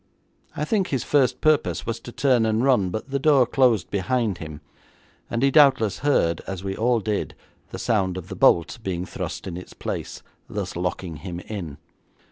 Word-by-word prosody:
I 150 - -2
think 195 +2 +1
his 135 -4 -1
first 130 -4 +2
purpose 155 -2 +2
was 115 0 -3
to 120 - -10
turn 125 -2 +2
and 110 +1 +1
run, 125 -9 +3
but 110 +8 -5
the 140 - 0
door 140 -3 +5
closed 125 -5 +2
behind 105 -1 0
him, 75 -2 -8 0.7
and 120 +2 -1
he 140 - +4
doubtless 135 - +4
heard, 85 - +2
as 95 -1 -5
we 95 0 -3
all 120 +2 +2
did, 105 0 -2 0.3
the - - -7
sound 95 -5 0
of 90 -1 -7
the 95 - -7
bolt 85 +3 +3
being 90 -4 -3
thrust 90 -2 -6
in 90 -3 -5
its 90 - -10
place, - - -5 0.3
thus - - -4
locking 90 -1 -3
him 85 +2 -6
in. 85 -10 -6
110 Hz, 185 wpm, -24 LUFS, 90-130 Hz, 0.7 s, door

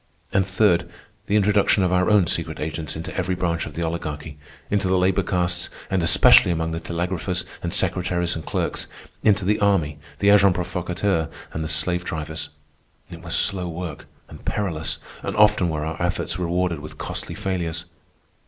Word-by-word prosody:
And 95 -1 +2
third, 95 -2 +2 0.4
the 105 - +1
introduction 105 -1 +3
of 90 - +2
our 90 +2 +3
own 105 -4 +5
secret - - -2
agents 80 +1 -4
into 80 +1 -6
every 95 0 0
branch 85 -2 -1
of 75 - -10
the 85 - -2
Oligarchy—into 80 +3 -4
the 95 0 +3
labor 95 +1 +3
castes 90 -2 -1 0.2
and 95 -1 +2
especially 85 +1 +7
among 80 -1 0
the 80 - -3
telegraphers 90 +2 -2 0.2
and - - -3
secretaries 90 -1 0
and 80 - -5
clerks, - - -2 0.3
into 105 -2 +3
the 105 +2 +2
army, 90 -8 +2 0.2
the 100 - +3
agents 100 -2 +6
provocateurs, 90 -1 -1 0.3
and 80 - -2
the - - -3
slave 90 +3 +1
drivers. 80 -1 -4 0.6
It 85 -1 -9
was 85 -2 -2
slow 95 -4 +1
work, 85 0 -6 0.2
and - - -12
perilous, 80 -6 -2 0.2
and - - -4
often 105 -4 +4
were 75 -1 -2
our 80 0 -4
efforts - - -1
rewarded 90 -1 0
with 75 +1 -10
costly - - -5
failures. 85 -3 -3
90 Hz, 170 wpm, -23 LUFS, 80-95 Hz, 0.6 s, especially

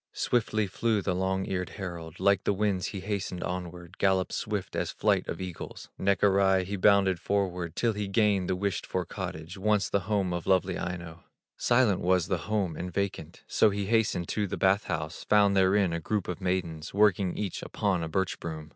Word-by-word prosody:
Swiftly 110 -3 +1
flew 110 +3 0
the 95 -1 -1
long 95 +1 0
eared 90 -2 -2
herald, 85 -4 -6
Like 100 0 +3
the - - +2
winds 100 -2 0
he 100 - -5
hastened 100 -3 -3
onward, 90 -1 -6
Galloped 95 -1 +2
swift 105 -3 -3
as - - -1
flight - - +1
of - - -4
eagles; 90 -3 -7
Neck 100 +1 +1
awry 95 -1 +4
he 100 +3 -4
bounded 95 -2 +4
forward 90 -4 -1
Till 115 -2 +1
he 105 -1 -3
gained 100 -2 +2
the 95 - +1
wished 95 -2 -2
for 90 -1 -2
cottage, 80 +5 -6
Once 105 0 +2
the 100 - +3
home 100 -4 +1
of 85 -1 -4
lovely 95 -1 +2
Aino. 85 -2 -6 0.3
Silent 120 -6 +3
was 90 -1 +2
the - - -2
home, 100 -7 0
and 90 +3 -5
vacant; 100 +1 -4
So 110 - +3
he 100 0 -2
hastened 105 -5 +1
to 105 -1 0
the - - -4
bath 95 +2 +3
house, 75 0 -4
Found 100 -1 +4
therein 95 -1 +3
a 85 - -1
group 105 +3 -2
of 90 +2 -4
maidens, 90 -3 -2
Working 100 -3 +3
each 100 -4 -3
upon 95 -4 -1
a 80 - -3
birch 95 +2 -1
broom. 80 -2 -6
95 Hz, 195 wpm, -28 LUFS, 90-100 Hz, 0.3 s, awry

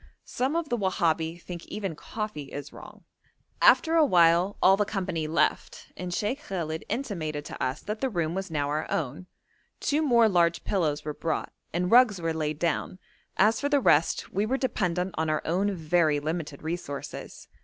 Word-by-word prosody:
Some 265 +5 -1
of 335 -3 -1
the 240 - 0
Wahabi 170 -4 0
think 175 -1 -8
even 195 -6 -4
coffee 210 -8 -6 0.2
wrong. - - -13 0.6
After 335 -10 +5
a 330 -1 +6
while 175 - +4
all 190 - +6
the 210 - +1
company 185 -6 -3
left, 160 - -1
and 180 -1 -5
Sheikh 215 - -2
Khallet 160 - -4
intimated 160 - -3
to - - -5
us 130 +3 -2
that 215 +1 -5
the 265 - +1
room 170 -6 -1
was 190 +1 -4
now 145 -3 -1
our 155 +2 -2
own. 150 +4 -3 0.5
Two 295 +2 +1
more 240 -6 +5
large 170 -4 +2
pillows 155 -6 -1
were 150 - -3
brought, 160 +2 -3 0.2
and 180 +2 -1
rugs 235 -5 +6
were 165 -1 -1
laid 155 -1 -2
down; 170 +2 -1 0.4
as 215 +3 +3
for 285 - 0
the 290 -1 +4
rest 165 - +2
we 200 - +1
were 250 +5 0
dependent 180 -8 -1
on 160 0 0
our 155 - 0
own 190 +5 +1
very 160 -2 +2
limited 155 -1 -4
resources. 160 -4 -6
175 Hz, 175 wpm, -27 LUFS, 160-210 Hz, 0.6 s, a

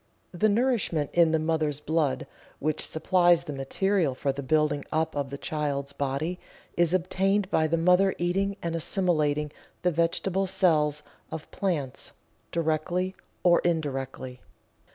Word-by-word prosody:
The 215 +5 +2
nourishment 210 - +1
in 170 -2 +5
the 160 - +3
mother's 155 -2 0
blood, 150 -2 0 0.3
which 155 +1 -1
supplies 175 +1 +3
the 150 - -6
material 155 +3 0
for 140 +1 -1
the 140 +1 -5
building 150 0 +1
up 160 0 0
of 140 -2 -2
the 140 - -6
child's 140 -2 -3
body, 145 +6 -2 0.4
is 170 -1 +3
obtained 190 +2 +1
by 155 - +3
the 165 +2 +1
mother 180 +3 +4
eating 195 +3 0
and 170 -1 -2
assimilating 155 -4 +1 0.3
the 180 - +3
vegetable 175 +4 0
cells 155 -6 +2 0.3
of 160 - -7
plants, 150 -10 -3 0.4
directly 170 +3 -1 0.3
or 175 -1 +5
indirectly. 135 -6 -3
160 Hz, 135 wpm, -27 LUFS, 150-180 Hz, 0.4 s, in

